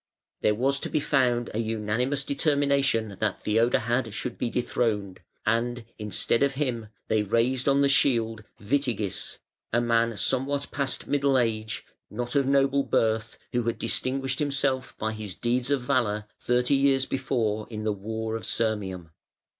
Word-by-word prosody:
There 105 - +3
was 135 +5 +1
found - - -11
to - - -2
be 150 -1 0
an 120 -4 +3
unanimous 115 +5 -1
determination 140 - +1
that 110 -3 -1
Iheodahad 115 +2 +2
should 120 +2 -4
be 120 - -2
dethroned, 110 -6 -1 0.3
and, 115 +1 0
instead 105 +2 0
of 140 -1 +2
him, 125 -6 -2 0.2
they 110 -1 +2
raised 120 +6 +1
on 140 0 +4
the 140 - +5
shield, 115 -6 +2 0.2
Witigis, 115 -4 -1 0.3
a 120 - +3
man 115 -1 +2
somewhat 135 +6 0
past 140 -2 -2
middle 140 -1 +2
age, 110 -2 -1 0.2
not 120 +3 -4
of 140 -2 +2
noble 140 0 +3
birth, 115 -3 0 0.2
who 120 - +2
had 115 -1 -1
distinguished 130 +3 -1
himself 140 -3 -1
by 110 0 -1
his 110 -4 -6
deeds 120 +2 0
of 140 -2 +2
valour 120 -5 0
thirty 125 +3 +2
years 135 -1 +3
before 115 -6 -1
in 110 -2 -5
the 105 -1 +1
war 110 +2 -4
of 115 - -3
Sirmium. 95 -7 -2
120 Hz, 155 wpm, -27 LUFS, 110-135 Hz, 0.3 s, the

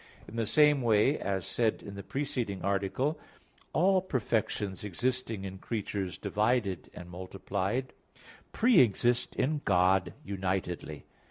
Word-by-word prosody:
In 110 - -10
the 115 -2 -1
same 150 0 +5
way, 115 +4 +3
as 95 -3 -2
said 115 -2 0
in 100 - -8
the 100 - -6
preceding 125 -5 -3
article, 100 - 0 0.5
all 185 +3 +3
perfections 110 - -1
existing 115 +1 -2
in 95 -1 -6
creatures 100 -4 -3
divided 105 -4 0
and 90 - -9
multiplied, 95 +6 -3 0.6
pre 240 +1 +5
exist 120 +1 +2
in 145 +3 0
God 90 -1 +3
unitedly. 95 -5 -3
105 Hz, 120 wpm, -30 LUFS, 95-130 Hz, 0.6 s, same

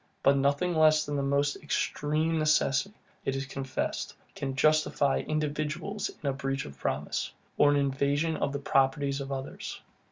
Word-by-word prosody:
But 140 +1 +5
nothing 140 +6 +2
less 155 -1 +5
than 145 - -3
the 140 - 0
most 140 +1 +1
extreme 155 +2 0
necessity, 155 +4 +2 0.3
it 135 - -1
is 135 0 -2
confessed, 135 -1 -3 0.2
can 135 -1 -4
justify 150 -1 +3
individuals 155 +6 -2
in - - -2
a 135 - +2
breach 135 0 -2
of 70 -2 -11
promise, - - -2 0.2
or 145 - +5
an 145 - +4
invasion 140 +3 +1
of 140 - -1
the 140 - -2
properties 140 0 +1
of 140 0 -6
others. 135 0 -5
140 Hz, 160 wpm, -29 LUFS, 135-155 Hz, 0.3 s, But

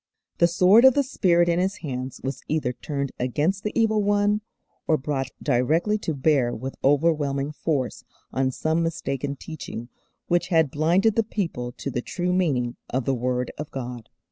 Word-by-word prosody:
The 170 - +6
Sword 185 +6 +5
of 265 -1 +7
the 285 - +3
Spirit 175 -9 +2
in 170 0 +2
His 190 +2 0
hands 130 -1 -4
was 135 0 -4
either 150 -5 0
turned 140 +1 -4
against 150 +10 0
the 210 - -1
Evil 220 -1 +3
One, 205 +1 +2 0.5
or 155 - +4
brought 135 -2 -2
directly 155 - +2
to 160 -6 -3
bear 135 -3 +2
with 130 +4 -5
overwhelming 145 -1 +2
force 145 -4 -2 0.3
on 130 0 +1
some 160 +5 0
mistaken 145 -4 -2
teaching 135 -6 -8 0.4
which 175 0 +1
had 160 -6 +3
blinded 175 +8 +2
the 225 - +3
people 165 - -3
to 140 - -5
the 120 - -2
true 180 +6 -2
meaning 135 -10 0
of 130 -1 -1
the 135 - +1
Word 125 0 -1
of 150 - -5
God. 125 -3 -6
150 Hz, 170 wpm, -24 LUFS, 130-180 Hz, 0.5 s, of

